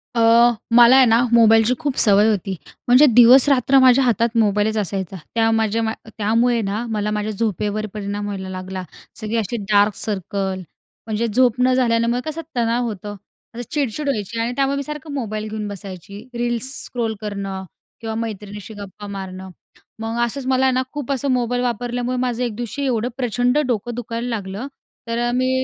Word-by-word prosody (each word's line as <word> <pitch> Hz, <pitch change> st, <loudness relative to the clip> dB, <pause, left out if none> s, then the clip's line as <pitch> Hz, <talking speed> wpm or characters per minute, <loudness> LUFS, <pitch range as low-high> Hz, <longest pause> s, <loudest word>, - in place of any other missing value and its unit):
अ, 230 Hz, -, +2 dB, 0.5 s
मला 240 Hz, +1 st, +8 dB
आहे 265 Hz, -, +7 dB
ना, 225 Hz, -1 st, +4 dB
मोबाईलची 225 Hz, 0 st, +5 dB
खूप 290 Hz, -4 st, -2 dB
सवय 205 Hz, +1 st, +5 dB
होती. 195 Hz, -2 st, -1 dB, 0.3 s
म्हणजे 250 Hz, +4 st, +7 dB
दिवस-रात्र 260 Hz, +2 st, +6 dB
माझ्या 260 Hz, 0 st, +6 dB
हातात 235 Hz, -1 st, +1 dB
मोबाईलच 210 Hz, 0 st, +2 dB
असायचा. 195 Hz, -2 st, -3 dB, 0.2 s
त्या 225 Hz, -1 st, +3 dB
माझ्या 225 Hz, 0 st, +1 dB
मा 220 Hz, 0 st, -1 dB, 0.2 s
त्यामुळे 230 Hz, +3 st, +2 dB
ना, 210 Hz, +3 st, -3 dB
मला 210 Hz, -1 st, -1 dB
माझ्या 210 Hz, 0 st, -2 dB
झोपेवर 210 Hz, 0 st, -2 dB
परिणाम 205 Hz, 0 st, -4 dB
व्हायला 195 Hz, -2 st, -5 dB
लागला. 185 Hz, 0 st, -6 dB, 0.4 s
सगळी 220 Hz, +1 st, -2 dB
अशी 225 Hz, +2 st, -2 dB
डार्क 205 Hz, 0 st, +4 dB
सर्कल, 195 Hz, -2 st, -3 dB, 0.5 s
म्हणजे 220 Hz, +1 st, -1 dB
झोप 245 Hz, +2 st, +2 dB
न 255 Hz, 0 st, +4 dB
झाल्यामुळे 235 Hz, -1 st, +1 dB
कसं 320 Hz, +2 st, -5 dB
तणाव 235 Hz, 0 st, +1 dB
होतं, 205 Hz, -1 st, -6 dB, 0.4 s
असं 240 Hz, 0 st, -7 dB
चिडचिड 290 Hz, -2 st, -2 dB
व्हायची 230 Hz, -3 st, -3 dB
आणि 230 Hz, +1 st, -1 dB
त्यामुळे 275 Hz, +1 st, +1 dB
मी 280 Hz, -, -2 dB
सारखं 300 Hz, +1 st, -7 dB
मोबाईल 215 Hz, -5 st, -4 dB
घेऊन 215 Hz, -1 st, -4 dB
बसायची. 200 Hz, +1 st, -9 dB
रील्स 240 Hz, +2 st, -1 dB
स्क्रोल 230 Hz, -3 st, -2 dB
करणं 200 Hz, -2 st, -5 dB, 0.4 s
किंवा 225 Hz, -1 st, -4 dB
मैत्रिणीशी 210 Hz, -2 st, -6 dB
गप्पा 205 Hz, 0 st, -9 dB
मारणं. 190 Hz, -1 st, -7 dB, 0.5 s
मग 225 Hz, +1 st, -3 dB
असंच 255 Hz, +3 st, -5 dB
मला 260 Hz, 0 st, +2 dB
आहे 260 Hz, -, +3 dB
ना 255 Hz, -, +1 dB
खूप 290 Hz, -2 st, -4 dB
असं 275 Hz, +1 st, -1 dB
मोबाईल 245 Hz, -1 st, 0 dB
वापरल्यामुळे 245 Hz, +1 st, -2 dB
माझं 250 Hz, -1 st, -1 dB
एक 235 Hz, -3 st, -3 dB
दिवशी 240 Hz, +5 st, -4 dB
एवढं 245 Hz, -2 st, 0 dB
प्रचंड 245 Hz, +1 st, +1 dB
डोकं 240 Hz, 0 st, -2 dB
दुखायला 235 Hz, 0 st, -4 dB
लागलं. 205 Hz, +1 st, -4 dB, 0.4 s
तर 230 Hz, 0 st, -2 dB
अ, -, -, -1 dB
मी 255 Hz, +1 st, +1 dB
230 Hz, 170 wpm, -20 LUFS, 205-245 Hz, 0.5 s, मला